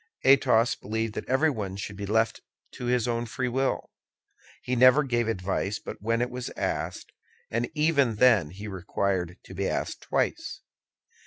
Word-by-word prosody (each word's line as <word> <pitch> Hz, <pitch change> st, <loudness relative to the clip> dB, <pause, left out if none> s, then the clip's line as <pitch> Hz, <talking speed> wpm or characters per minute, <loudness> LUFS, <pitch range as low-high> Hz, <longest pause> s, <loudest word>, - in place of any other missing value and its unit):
Athos 125 Hz, -3 st, +5 dB
believed 110 Hz, +1 st, -3 dB
that -, -, -6 dB
everyone 130 Hz, -9 st, +1 dB
should 100 Hz, +1 st, -6 dB
be 100 Hz, 0 st, -5 dB
left 110 Hz, +2 st, +1 dB, 0.3 s
to 125 Hz, -, -7 dB
his 125 Hz, -1 st, +1 dB
own 120 Hz, 0 st, -1 dB
free 125 Hz, +3 st, -2 dB
will. 130 Hz, +2 st, -1 dB, 0.7 s
He 125 Hz, -, -1 dB
never 130 Hz, +4 st, +6 dB
gave 120 Hz, -3 st, 0 dB
advice 100 Hz, 0 st, -1 dB
but -, -, -9 dB
when 115 Hz, +3 st, +1 dB
it 125 Hz, -, -3 dB
was 125 Hz, 0 st, -5 dB
asked, -, -, -3 dB, 0.4 s
and 115 Hz, +1 st, -1 dB
even 145 Hz, -6 st, +3 dB
then 105 Hz, -9 st, +5 dB
he 100 Hz, +6 st, -8 dB
required 95 Hz, -2 st, -2 dB
to -, -, -12 dB
be 95 Hz, +1 st, -1 dB
asked -, -, -3 dB
twice. -, -, -2 dB
115 Hz, 160 wpm, -27 LUFS, 100-125 Hz, 0.7 s, never